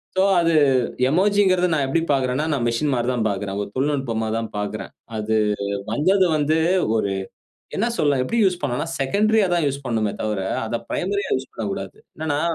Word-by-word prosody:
So, 190 - +3 0.2
அது 165 -1 +2 0.6
emerging 200 +4 +3
கிறத 180 0 +2
நான் 145 -3 +1
எப்பிடி 165 +5 +1
பார்க்குறேன்னா, 130 +2 0
நான் 130 -5 0
மெஷின்மாரி 120 0 0
தான் 115 -3 0
பார்க்குறேன். 100 0 -3
ஒரு - - -8
தொழில்நுட்பமா 130 -5 -1
தான் 115 -1 -3
பார்க்குறேன். 105 0 -4 0.3
அது 110 +1 0 0.6
வந்தது 185 - +3
வந்து 155 +1 +2 0.4
ஒரு 100 -3 0 0.6
என்ன 220 - +1
சொல்லலாம் 140 -3 +2
எப்பிடி 230 - 0
யூஸ் 180 -3 +1
பண்ணலாம், 145 +5 -2
செகண்ட்ரியா 210 +9 +2
தான் 170 -2 +1
யூஸ் 140 0 -5
பண்ணுமே 110 -4 0
தவர, 105 -2 -1 0.3
அத 115 - -2
பிரைமரி 200 +3 -1
யா - - -3
யூஸ் 130 0 -6
பண்ணக்கூடாது. 100 -3 -5 0.2
என்னனா 155 -2 -1
140 Hz, 165 wpm, -22 LUFS, 115-170 Hz, 0.6 s, So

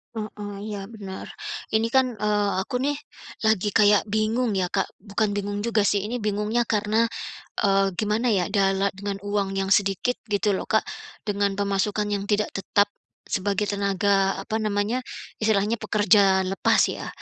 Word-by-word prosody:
Heeh. 210 -1 -5 0.2
Iya, 205 -2 -4
bener. 195 -3 -7 0.5
Ini 220 +1 +2
kan, 260 -1 +6
eee, 210 -1 +1
aku 220 - -5
nih 290 +1 0 0.5
lagi 210 -1 +2
kayak 205 -1 +5
bingung 220 +2 +1
ya, 180 - +1
Kak. 195 +2 -1
Bukan 205 +1 -1
bingung 205 0 -3
juga 220 -3 +2
sih, 200 -1 +1
ini 235 +4 -3
bingungnya 210 +2 0
karena, 220 +2 +2 0.6
eee, 195 -1 +4
gimana 215 +4 0
ya 190 -5 +2
dala 195 -1 +2
dengan 200 +1 -5
uang 200 -1 -1
yang 195 0 -1
sedikit, 200 +5 +2
gitu 205 0 +1
loh, 190 - -2
Kak, 220 - +2 0.4
dengan 200 -1 0
pemasukan 200 +1 0
yang 200 0 -2
tidak 210 0 +1
tetap 205 +1 +1 0.3
sebagai 200 +1 -1
tenaga, 200 -1 +1
apa 220 0 -2
namanya, 210 +3 0 0.4
istilahnya 215 +1 +1
pekerja 205 -3 +4
lepas 190 +1 +2
ya, - - -6
205 Hz, 155 wpm, -25 LUFS, 195-215 Hz, 0.6 s, kan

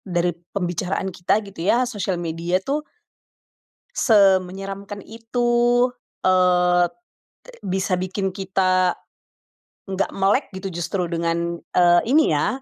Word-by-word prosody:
dari 175 -2 -1 0.2
pembicaraan 185 +1 -2
kita 205 +5 0
gitu 195 -4 -11
ya, 245 +5 +3
sosial 200 -6 -2
media 170 +1 -2
tuh 300 +2 -2 1.1
...semenyeramkan 195 -1 +1
itu, 230 +2 -3 0.7
eee, 180 -1 +4
e 350 - -28 0.5
bisa 190 -1 -1
bikin 185 +1 -2
kita, 185 -2 +1 0.9
nggak 195 0 -1
melek 195 +7 +2
gitu, 190 +1 -5
justru 175 +1 -3
dengan, 170 0 -1 0.2
eee, 175 -1 +5
ini 315 +1 +5
ya 205 - 0
185 Hz, 110 wpm, -22 LUFS, 175-200 Hz, 1.1 s, eee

